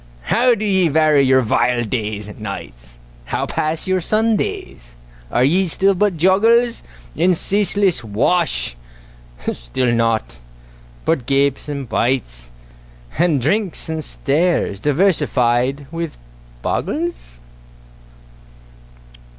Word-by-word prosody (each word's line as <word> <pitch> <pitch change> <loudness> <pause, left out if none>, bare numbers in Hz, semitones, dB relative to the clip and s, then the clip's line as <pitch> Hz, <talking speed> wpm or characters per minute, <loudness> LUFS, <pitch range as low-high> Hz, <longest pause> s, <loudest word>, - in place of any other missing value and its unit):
How 245 - +2
do 215 - -4
ye 190 -4 +2
vary 155 -1 +3
your 130 -1 +4
vile 120 +1 +1
days 105 -2 -3
and 105 - -11
nights? - - -8 0.3
How - - -2
pass 155 +2 -1
your 185 -1 +1
Sundays? 215 - -2 0.3
Are 120 - +1
ye 180 +8 +2
still 195 +3 +3
but 195 -1 0
joggles 225 +7 +3 0.3
In 180 0 +2
ceaseless 200 -3 +3
wash? 120 - +1 0.8
Still 120 - -2
naught 115 - -1 0.7
but 125 - -1
gapes 140 +1 0
and 140 -3 -5
bites, 110 - -1 0.7
And 165 -5 +2
drinks 180 - 0
and 160 -1 -3
stares, 150 - -1
diversified 140 - +1
with 165 -1 -5 0.5
boggles? 295 - -3
150 Hz, 105 wpm, -18 LUFS, 120-185 Hz, 0.8 s, your